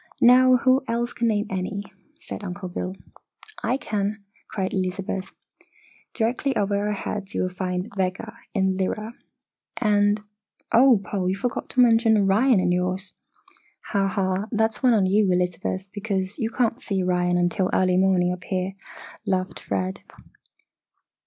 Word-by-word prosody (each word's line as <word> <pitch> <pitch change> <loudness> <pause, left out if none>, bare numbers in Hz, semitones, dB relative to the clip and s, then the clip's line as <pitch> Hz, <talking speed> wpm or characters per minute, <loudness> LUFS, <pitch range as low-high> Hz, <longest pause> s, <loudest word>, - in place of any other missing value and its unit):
Now, 255 +1 +7
who 260 +2 +3
else 235 +1 -1
can 235 - 0
name 210 -2 +1
any?" 190 +2 -3 0.4
said 215 - -8
Uncle 185 -1 -5
Bill. 185 +1 -4 0.7
"I 245 +4 0
can!" 210 -3 -3 0.2
cried 190 -2 -3
Elizabeth. 190 0 -3 0.8
"Directly 250 +4 0
over 200 0 +1
our 210 - 0
heads 200 0 -5
you - - +1
will 185 - -1
find 180 +1 -2
Vega, 190 +4 -2 0.2
in 190 -2 +1
Lyra. 215 +4 -2 0.7
And 205 -2 +3 0.5
oh, 245 -1 +6
Paul, 190 -3 -2
you 190 - 0
forgot 235 +5 -3
to 255 - +3
mention 225 -2 +5
Orion 210 +4 +4
in 180 -1 +1
your's!" 185 +2 -1 0.8
"Ha, 200 -1 +1
ha! 195 +1 -1
That's 220 -1 0
one 250 -3 +5
on 200 -3 +3
you, 195 0 +3
Elizabeth, 180 +1 -1
because 200 -2 -3
you 225 - 0
can't 240 +1 0
see 195 -3 -1
Orion 180 -1 +1
until 175 +1 +1
early 185 -1 +2
morning 185 -1 +3
up 180 -1 -9
here," 185 0 -2 0.5
laughed 185 -1 -1
Fred. 95 -1 -3
195 Hz, 145 wpm, -24 LUFS, 185-220 Hz, 0.8 s, Now